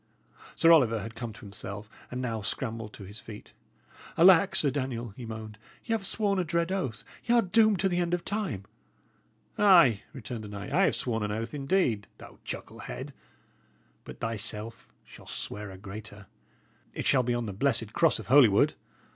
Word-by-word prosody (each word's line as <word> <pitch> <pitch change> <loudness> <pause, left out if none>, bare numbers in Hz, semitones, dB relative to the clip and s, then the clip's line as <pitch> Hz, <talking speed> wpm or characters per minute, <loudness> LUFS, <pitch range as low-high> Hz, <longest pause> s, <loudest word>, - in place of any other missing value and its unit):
Sir 165 - +5
Oliver 120 -9 +5
had 110 +2 -7
come 120 0 -6
to - - -14
himself, 100 0 -7 0.2
and 125 +1 -4
now 115 -3 -2
scrambled 115 0 -3
to 100 - -10
his 100 +3 -9
feet. 105 -2 -11 0.6
"Alack, 180 +1 +6
Sir 145 -4 +2
Daniel!" 130 -4 -3
he 115 +4 -9
moaned, 110 -1 -8 0.3
"y' 225 - -1
'ave 220 -3 -1
sworn 200 -1 +1
a - - +2
dread 170 +1 0
oath; 135 - -2 0.2
y' 235 - +1
are 235 - +5
doomed 215 +1 +4
to 195 - +3
the 180 -1 0
end 175 0 +1
of 175 - -7
time." 200 - -2 1.0
"Ay," 170 - +6
returned 120 -3 -7
the - - -7
knight, 100 -1 -7
"I 195 +2 +5
have - - +2
sworn 115 -3 -1
an 105 0 -2
oath, 115 +2 -4
indeed, 135 - 0
thou - - -14
chucklehead; - - -7 0.9
but - - -11
thyself 115 0 -5
shalt - - -14
swear 105 0 -5
a 95 - -10
greater. 100 +1 -9 0.7
It - - -4
shall 130 - +4
be 120 0 0
on 120 -1 -2
the 100 - -5
blessed 115 -1 0
cross 165 -3 +3
of - - -8
Holywood. 125 -7 +5
120 Hz, 180 wpm, -28 LUFS, 105-170 Hz, 1.0 s, Alack